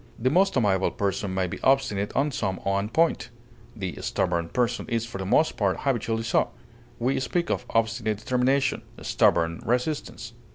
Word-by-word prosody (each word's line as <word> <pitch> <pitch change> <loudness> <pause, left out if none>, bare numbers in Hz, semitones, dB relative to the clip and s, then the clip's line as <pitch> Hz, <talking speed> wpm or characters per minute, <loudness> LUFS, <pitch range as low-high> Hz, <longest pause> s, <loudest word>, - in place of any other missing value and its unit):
The 130 +3 +1
most 190 0 +3
amiable 95 -5 +2
person 100 0 -2
may 95 0 0
be 90 - -6
obstinate 105 -7 +2
on 145 +3 +2
some 95 -7 -2
one 100 +1 0
point; 160 -5 +1 0.5
the 95 -8 -5
stubborn 85 -2 -1
person 120 +2 -1
is 115 -1 0
for 115 -4 -7
the 95 - -4
most 155 +10 +3
part 100 -3 0
habitually 115 -4 0
so; 115 - +1 0.5
we 125 +3 0
speak 170 +6 -1
of - - -2
obstinate 110 -1 0
determination, 130 +5 +1 0.2
stubborn 85 0 +2
resistance. 125 -1 -2
115 Hz, 160 wpm, -26 LUFS, 100-130 Hz, 0.5 s, most